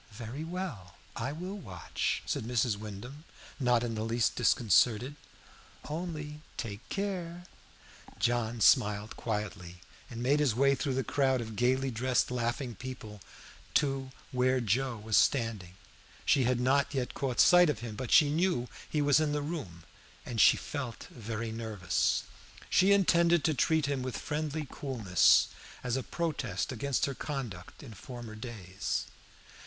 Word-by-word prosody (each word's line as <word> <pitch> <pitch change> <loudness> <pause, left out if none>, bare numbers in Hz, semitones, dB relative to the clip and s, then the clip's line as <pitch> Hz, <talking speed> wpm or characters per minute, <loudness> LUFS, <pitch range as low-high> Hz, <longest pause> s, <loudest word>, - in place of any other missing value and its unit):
"Very 120 +7 -6
well, 160 - -6 0.2
I 130 +4 -2
will 180 +6 -6
watch," 95 - -3
said - - -2
Mrs. 115 -1 +1
Wyndham, 110 +8 -8 0.4
not 125 -3 +3
in 120 -1 -2
the 110 - -3
least 115 0 +1
disconcerted. 120 +4 +3 0.7
"Only 150 -2 -5 0.2
take 110 +1 -6
care." 180 -4 -3 0.7
John 120 -1 0
smiled 105 -3 +3
quietly, 100 -5 -4 0.3
and 120 -1 -5
made 140 +4 +3
his 140 -7 +2
way 140 +2 +4
through 135 -1 -1
the 135 - 0
crowd 135 -1 +1
of 110 -2 -6
gaily 130 +3 +1
dressed, 125 +2 +1
laughing 120 +1 -2
people 110 -3 -8 0.5
to 135 -2 +1 0.2
here 130 0 +2
Joe 120 +2 0
was 110 0 +1
standing. 110 -9 +1 0.5
She 135 -3 +4
had 125 0 +1
not 140 +3 +2
yet 125 -2 -2
caught 130 -3 -2
sight 175 -2 +7
of 115 -7 -2
him, 115 -3 -6
but 120 +2 -5
she 150 -3 +6
knew 160 -6 +1 0.2
he 150 -2 +1
was 145 0 +5
in 155 -2 +1
the 150 -1 -1
room, 135 - -6 0.4
and 115 -4 0
she - - +7
felt 130 -6 -5
very 115 -1 -5
nervous. 110 -5 0 0.5
She 190 +2 +5
intended 170 -4 +4
to 160 - +2
treat 160 +2 +2
him 140 -2 -1
with 125 -5 -3
friendly 150 0 -3
coolness, 110 -13 +3 0.3
as 125 -1 -1
a 135 - 0
protest 135 - -2
against 130 +2 0
her 140 - -3
conduct 130 - -6
in 120 -5 -10
former 120 +2 -9
days. 105 -4 -4
125 Hz, 150 wpm, -31 LUFS, 110-145 Hz, 0.7 s, sight